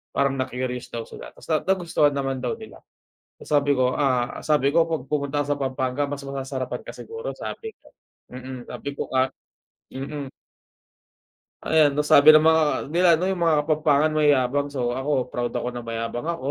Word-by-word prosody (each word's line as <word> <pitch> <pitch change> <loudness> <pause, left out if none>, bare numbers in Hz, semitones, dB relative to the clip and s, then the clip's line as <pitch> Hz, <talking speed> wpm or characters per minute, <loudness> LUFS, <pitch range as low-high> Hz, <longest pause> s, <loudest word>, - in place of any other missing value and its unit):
parang 135 -1 +1
na-curious 125 -1 -3
daw 115 -1 -4
sila - - -10
ta's - - -15
na 155 - +2
nagustuhan 170 -6 +1
naman 135 -1 -2
daw 125 -1 -2
nila. - - -12 0.6
Ta's - - -13
sabi 145 0 +3
ko, 130 0 +1
ah, 130 -4 0
sabi 150 -3 +2
ko, 170 - +6
'pag 155 -5 -3
pumunta 145 -1 -1
ka 145 - 0
sa 145 - -11
Pampanga 130 +1 -1
mas 145 0 -5
masasarapan 135 -1 -5
ka - - -8
siguro 455 +2 -6
sabi 445 -1 -6
ko. - - -21 0.4
Mm. 130 -1 -8
Sabi 140 - -6
ko - - -3
nga 130 0 +2 0.6
Mm. 140 +1 -5 1.4
Ayan, 155 -2 +5
ta's 150 - +1
sabi 145 +2 +9
ng 155 - +9
mga 160 0 +5 0.3
nila 180 +1 +4
ano, 180 - -1
yung 190 -3 -1
mga 155 -3 +2
kapampangan 155 -1 +2
mayayabang, 145 -2 +2
so 120 -3 -2
ako 135 -1 -1
proud 120 -1 -3
ako 125 - -3
na 120 - -5
mayabang 115 +1 -4
ako. 165 -6 -5
140 Hz, 180 wpm, -24 LUFS, 130-150 Hz, 1.4 s, sabi